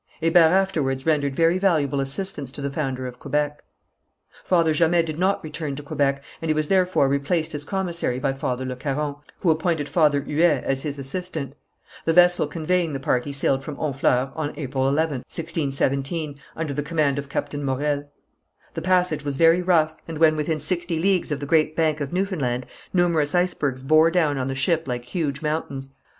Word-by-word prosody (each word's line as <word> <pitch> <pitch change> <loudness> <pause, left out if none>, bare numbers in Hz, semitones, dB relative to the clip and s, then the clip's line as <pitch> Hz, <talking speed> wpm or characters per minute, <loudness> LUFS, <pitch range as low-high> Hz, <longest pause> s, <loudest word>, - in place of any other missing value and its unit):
Hébert 165 0 +5
afterwards 160 -8 +1
rendered 145 -4 +1
very 165 +3 +3
valuable 150 -8 +2
assistance 140 0 -4
to - - -8
the 140 0 -2
founder 135 -3 -3
of 125 -1 -7
Quebec. 150 +1 -2 0.8
Father 165 -3 +3
Jamet 165 +2 +3
did 155 0 -5
not 190 +2 +1
return 155 -2 -4
to 145 - -7
Quebec, 140 -1 0 0.2
and 165 - -3
he 155 - +2
was 155 -1 -1
therefore 185 -6 +3
replaced 140 +4 0
as 145 -1 -3
commissary 170 -7 -2
by 135 +1 0
Father 130 -1 -3
Le 130 0 -4
Caron, 145 +2 -3 0.2
who 170 - +4
appointed 160 -2 0
Father 150 -4 +3
Huet 155 +3 +2
as 135 0 0
his 145 -1 -4
assistant. 145 0 -4 0.5
The 165 - +2
vessel 175 -2 +5
conveying 165 +1 -1
the 135 - -3
party 130 +1 0
sailed 135 -1 0
from 150 +1 -6
Honfleur 135 -3 0
on 150 -2 -3
April 135 -2 -2
11th, 145 -3 -1
1617, 145 -1 -1 0.2
under 160 -3 -3
the 145 - -2
command 150 -2 0
of 140 0 -7
Captain 145 0 -3
Morel. 145 +2 -1 0.6
The - - -4
passage 180 -4 +1
was 140 -2 -3
very 165 +3 +5
rough, 160 -3 +2
and 165 -2 -5
when 155 0 +5
within 155 +1 -1
sixty 170 +2 0
leagues 185 0 +1
of 145 - -1
the 145 - -4
Great 155 +1 +2
Bank 155 -2 +1
of 140 - -3
Newfoundland, 155 -10 -1 0.3
numerous 170 -4 +2
icebergs 145 -7 0
bore 155 +4 +5
down 160 -5 +1
on 130 - -2
the 135 - -3
ship 160 +4 0
like 125 -1 -3
huge 140 0 -3
mountains. 140 -3 -3
150 Hz, 185 wpm, -23 LUFS, 140-165 Hz, 0.8 s, Hébert